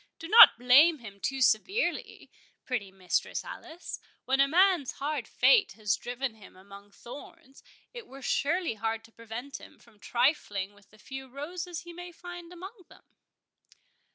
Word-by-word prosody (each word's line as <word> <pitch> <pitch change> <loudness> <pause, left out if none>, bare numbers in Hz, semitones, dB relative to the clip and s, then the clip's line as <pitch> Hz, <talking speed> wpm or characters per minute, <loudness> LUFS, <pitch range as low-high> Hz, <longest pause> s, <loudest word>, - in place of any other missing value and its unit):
—Do 325 - -8
not 460 - +9
blame 275 +7 +6
him 210 -6 -12
too 270 +6 -3
severely, 370 - 0 0.3
pretty 225 -7 -3
Mistress 190 -2 -2
Alice; 335 +3 -8 0.3
when 265 +1 +1
a 275 - +5
man's 355 -2 +3
hard 285 -4 -4
fate 475 -5 +4
has 210 -4 0
driven 245 +2 -4
him 215 -3 -16
among 200 +2 -14
thorns, 265 +4 -13 0.3
it 475 -4 -9
were 270 0 -12
surely 330 +2 0
hard 225 +1 -3
to 230 - -18
prevent 230 +5 -8
him - - -15
from 225 -3 -23
trifling 205 -6 0
with 205 -1 -23
the 215 - -21
few 265 +4 -9
roses 335 +5 -6
he 345 0 -11
may 355 +1 -9
find 350 0 -10
among 375 +2 -11
them?" - - -18
270 Hz, 155 wpm, -29 LUFS, 225-345 Hz, 0.3 s, not